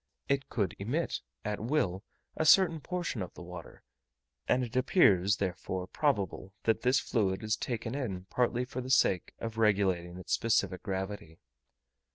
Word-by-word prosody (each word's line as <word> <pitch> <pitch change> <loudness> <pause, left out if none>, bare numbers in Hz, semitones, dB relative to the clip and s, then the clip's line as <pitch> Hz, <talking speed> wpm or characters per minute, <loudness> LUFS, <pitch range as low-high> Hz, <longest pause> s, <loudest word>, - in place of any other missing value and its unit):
It 140 0 0
could 100 -6 -1
emit, 130 +12 -1 0.2
at 105 0 -2
will, 110 -6 0 0.3
a - - 0
certain 165 0 +6
portion 175 - -3
of 90 - -6
the - - -9
water, 85 -1 -10 0.6
and 130 - +3
it 120 0 -6
appears, 105 - +4
therefore, 95 -1 -3
probable 100 - -1
that 110 0 +2
this 130 +2 +3
fluid 100 -5 0
is 110 0 +1
taken 115 -1 -4
in 100 -10 -3
partly 125 +4 0
for 130 0 -5
the 130 - -7
sake 95 -9 +2
of 115 0 -5
regulating 95 -5 +2
its 90 - -4
specific 100 -5 +1
gravity. 95 -4 -5
110 Hz, 155 wpm, -31 LUFS, 95-130 Hz, 0.6 s, certain